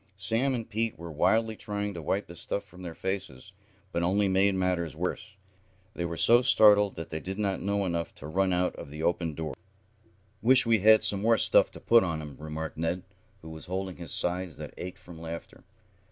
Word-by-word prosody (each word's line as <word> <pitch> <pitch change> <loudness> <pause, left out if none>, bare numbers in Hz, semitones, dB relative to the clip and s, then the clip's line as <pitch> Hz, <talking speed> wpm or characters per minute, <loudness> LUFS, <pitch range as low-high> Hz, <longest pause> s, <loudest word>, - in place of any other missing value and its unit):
Sam 115 +7 0
and 115 -2 -5
Pete 115 -2 -2
were 85 0 -8
wildly 110 +8 +2
trying 105 -1 -4
to 85 - -6
wipe 95 +6 -1
the 85 - -12
stuff 100 - -3
from 95 -2 -15
their 85 -3 -7
faces, 95 -5 -5 0.4
but 85 - -1
only 100 +4 +2
made 95 +1 +3
matters 90 -4 -1
worse. 95 +5 -4 0.6
They 85 - -3
were 85 -1 -4
so 120 +1 +5
startled 105 -5 +5
that 80 - -7
they 80 - -3
did 95 +5 -6
not 100 -3 -1
know 100 +1 0
enough 85 -2 -2
to - - -10
run 95 +5 +1
out 90 0 0
of - - -8
the 75 +2 -7
opened 85 -2 0
doors. 75 -4 -5 0.8
"Wish 130 +2 +7
we 115 -1 +3
had 110 +3 +6
some 100 -2 +2
more 115 +1 +4
stuff - - +4
to - - -10
put 115 -1 +5
on 80 -4 -2
'em," 75 -3 -8
remarked 80 +1 -6
Ned, 85 +3 -2 0.4
who 80 - -9
was 80 -2 -10
holding 95 0 -4
his 85 -4 -6
sides 90 -2 -2
that - - -8
ached 90 0 -7
from 85 -2 -13
laughter. 85 0 -8
95 Hz, 210 wpm, -28 LUFS, 85-105 Hz, 0.8 s, Wish